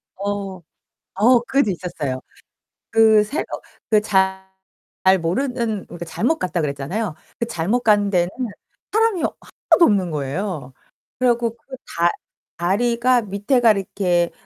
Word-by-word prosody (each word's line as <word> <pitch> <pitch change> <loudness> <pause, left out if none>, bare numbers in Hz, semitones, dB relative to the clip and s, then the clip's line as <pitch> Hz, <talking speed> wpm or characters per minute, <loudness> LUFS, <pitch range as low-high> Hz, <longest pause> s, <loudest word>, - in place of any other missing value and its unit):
어. 195 -2 -4 0.5
어 235 +5 +5
그것도 265 -4 +1
있었어요. 155 -8 -3 0.7
그 220 -1 +6
새어 280 +10 -3 0.5
그 215 -1 +5
잘 190 -2 0 0.7
모르는 220 +3 -1
그러니까 170 0 -8
잘못 245 - 0
갔다 180 -1 -1
그랬잖아요. 150 +7 -2 0.2
그 235 - -1
잘못 220 +3 0
간 205 -3 +3
데는 175 -2 +2 0.6
사람이 440 -4 +2
하나도 340 - +1
없는 190 - +2
거예요. 150 -1 -3 0.5
그래 250 -1 +3
갖고 235 -1 +1
그 260 +3 -11 0.2
다 170 +1 +5 0.5
다리가 235 +7 +2
밑에가 215 +4 +3
이렇게 180 -3 0
205 Hz, 255 characters per minute, -21 LUFS, 175-235 Hz, 0.7 s, 그